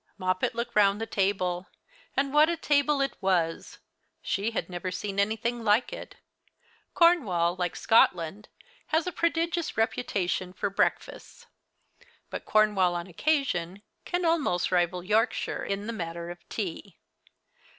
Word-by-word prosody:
Moppet 185 +3 -1
looked 235 +1 -4
round 205 -1 +4
the 225 - -2
table; 190 -3 -1 0.5
and 275 0 +1
what 305 +2 +6
a 340 - -1
table 290 -2 +2
it 275 - -1
was! 175 -4 0 0.5
She 200 +3 -1
had 230 - -3
never 180 0 -4
seen 195 +2 -4
anything 225 +3 0
like 225 - +2
it. - - -8 0.8
Cornwall, 200 - +3
like 180 -2 -2
Scotland, 185 -2 +2 0.4
has 320 +1 +1
a 360 - -2
prodigious 335 0 -1
reputation 190 -5 -1
for 195 +2 -2
breakfasts; 200 - -2 0.9
but - - -6
Cornwall, 205 -4 +3
on 170 0 -3
occasion, 195 - -1 0.2
can 355 0 -2
almost 295 - +1
rival 180 0 +1
Yorkshire 215 +4 0
in 200 +1 -3
the 230 - -4
matter 170 -3 -5
of 175 - -13
tea. 195 -2 -5
205 Hz, 135 wpm, -28 LUFS, 180-270 Hz, 0.9 s, what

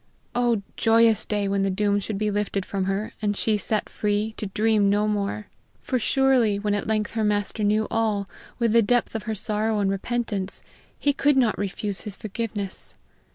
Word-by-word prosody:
Oh, 240 -4 +1
joyous 225 -1 +4
day 205 -1 0
when 195 0 0
the 195 - +1
doom 205 +1 +1
should 205 0 -3
be 210 +1 0
lifted 205 -2 -1
from 195 -2 -2
her, 195 +3 -2
and 205 -1 0
she 220 - +2
set 210 +1 -1
free, 210 +1 -1
to 210 - -3
dream 210 0 +2
no 205 +1 +2
more! 210 0 -2 0.4
For 255 - 0
surely, 250 -4 +3
when 205 0 -1
at 205 - -2
length 215 -1 0
her 225 -1 -1
master 210 +1 0
knew 215 +1 +2
all, 215 -3 0 0.3
with 230 -2 +1
the 230 - +6
depth 245 +2 +1
of 220 -2 -4
her 220 - -1
sorrow 215 +1 0
and 200 -1 +1
repentance, 200 -1 -3 0.3
he 285 - +1
could 285 0 +2
not 240 -5 +3
refuse 200 0 -3
his 205 -2 -5
forgiveness! 210 -3 -4
210 Hz, 190 wpm, -24 LUFS, 200-225 Hz, 0.4 s, the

